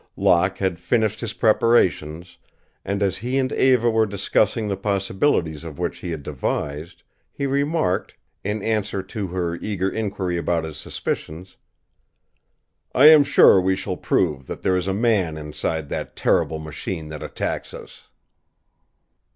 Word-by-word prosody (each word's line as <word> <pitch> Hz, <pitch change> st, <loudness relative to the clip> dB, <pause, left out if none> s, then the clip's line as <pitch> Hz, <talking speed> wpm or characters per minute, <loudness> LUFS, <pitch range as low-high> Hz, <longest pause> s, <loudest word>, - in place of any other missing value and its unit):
Locke 95 Hz, +2 st, +3 dB
had 95 Hz, -3 st, -1 dB
finished 110 Hz, +2 st, 0 dB
his 115 Hz, -3 st, -4 dB
preparations, 90 Hz, -7 st, +1 dB, 0.4 s
and 100 Hz, +1 st, -1 dB
as 95 Hz, -1 st, 0 dB
he 125 Hz, +5 st, -2 dB
and 130 Hz, -1 st, 0 dB
Eva 125 Hz, -3 st, +3 dB
were 110 Hz, -1 st, +2 dB
discussing 105 Hz, +2 st, 0 dB
the 100 Hz, -, -1 dB
possibilities 95 Hz, -, 0 dB
of 80 Hz, -4 st, -8 dB
what -, -, -2 dB
he 90 Hz, -, -8 dB
had 80 Hz, -4 st, -5 dB
devised, 75 Hz, +2 st, -4 dB, 0.3 s
he 140 Hz, -, -4 dB
remarked, 140 Hz, -, 0 dB, 0.3 s
in 105 Hz, +1 st, -3 dB
answer 105 Hz, -3 st, -1 dB
to 100 Hz, +1 st, -5 dB
her 85 Hz, -1 st, -2 dB
eager 100 Hz, -1 st, -2 dB
inquiry 100 Hz, -5 st, -2 dB
about 85 Hz, 0 st, 0 dB
his 80 Hz, -2 st, -7 dB
suspicions, 85 Hz, +5 st, -5 dB, 1.4 s
"I 145 Hz, +4 st, +9 dB
am 155 Hz, -2 st, +8 dB
sure 95 Hz, -8 st, +6 dB
we 95 Hz, +1 st, +1 dB
shall -, -, -4 dB
prove 75 Hz, -7 st, 0 dB
that -, -, -7 dB
there 95 Hz, -, +2 dB
is 90 Hz, 0 st, -1 dB
a 95 Hz, -, 0 dB
man 100 Hz, -8 st, +1 dB
inside 75 Hz, 0 st, -4 dB
the -, -, -4 dB
terrible 80 Hz, -, +1 dB
machine 80 Hz, +1 st, -6 dB
that 75 Hz, -1 st, -7 dB
attacks -, -, -4 dB
us." -, -, -12 dB
95 Hz, 150 wpm, -22 LUFS, 85-110 Hz, 1.4 s, I